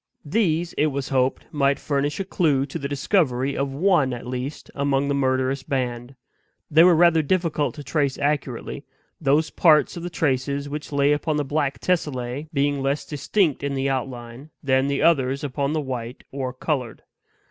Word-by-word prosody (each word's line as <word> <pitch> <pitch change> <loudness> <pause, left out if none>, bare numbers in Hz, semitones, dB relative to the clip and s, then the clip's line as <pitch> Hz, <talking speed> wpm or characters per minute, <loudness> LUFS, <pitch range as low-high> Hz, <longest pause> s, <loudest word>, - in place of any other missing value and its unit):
These, 170 -1 0
it 155 - +4
was 140 -2 -3
hoped, 130 -1 +1
might 140 -2 +2
furnish 145 +2 -1
a 195 - -2
clew 150 -8 +1
to - - -6
the 140 - -3
discovery 140 -3 +1
of 140 0 -1
one 150 -3 +2
at 120 - -7
least 125 +3 -5
among 140 0 0
the 140 - +1
murderous 130 0 +1
band. 125 -1 -3 0.6
They 160 +2 +7
were 175 -1 +6
rather 165 -1 +5
difficult 155 -2 0
to 145 - -8
trace 140 -1 0
accurately; 145 -2 -2 0.4
those 150 +2 +2
parts 155 -5 +4
of 170 - -6
the 175 - -4
traces 140 -3 -1
which 150 +1 -6
lay 140 0 +3
upon 150 +1 0
the 145 - -1
black 145 -1 -1
tessellae 145 -5 -2
being 140 -1 0
less 140 +1 -1
distinct 155 +1 0
in 140 -1 -1
the 135 0 0
outline 125 +1 -5
than 130 -1 +2
the 140 -1 0
others 140 -3 +2
upon 140 +1 -1
the 155 - 0
white 125 -3 -5
or 135 -2 -3
colored. 130 -3 -3
140 Hz, 175 wpm, -23 LUFS, 130-150 Hz, 0.6 s, They